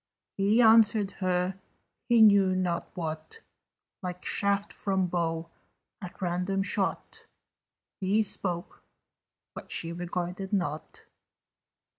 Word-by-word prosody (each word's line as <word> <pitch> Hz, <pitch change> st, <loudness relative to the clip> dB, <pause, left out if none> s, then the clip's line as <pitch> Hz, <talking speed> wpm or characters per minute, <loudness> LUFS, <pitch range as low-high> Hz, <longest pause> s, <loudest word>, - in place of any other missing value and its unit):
He 210 Hz, +5 st, +3 dB
answered 220 Hz, -2 st, +5 dB
her 185 Hz, +1 st, 0 dB, 0.5 s
he 235 Hz, -2 st, +6 dB
knew 200 Hz, -3 st, +5 dB
not 180 Hz, -2 st, -2 dB
what: 160 Hz, -, -6 dB, 0.6 s
Like 180 Hz, -1 st, -6 dB
shaft 200 Hz, 0 st, +1 dB
from 190 Hz, -2 st, 0 dB
bow 165 Hz, -1 st, -2 dB, 0.5 s
at 180 Hz, -2 st, -9 dB
random 180 Hz, +2 st, -1 dB
shot, 195 Hz, 0 st, -2 dB, 0.7 s
He 200 Hz, +3 st, +2 dB
spoke, 180 Hz, -3 st, -4 dB, 0.7 s
but -, -, -10 dB
she 165 Hz, 0 st, -2 dB
regarded 180 Hz, +2 st, -4 dB
not. 160 Hz, -6 st, -3 dB
185 Hz, 100 wpm, -28 LUFS, 175-200 Hz, 0.7 s, he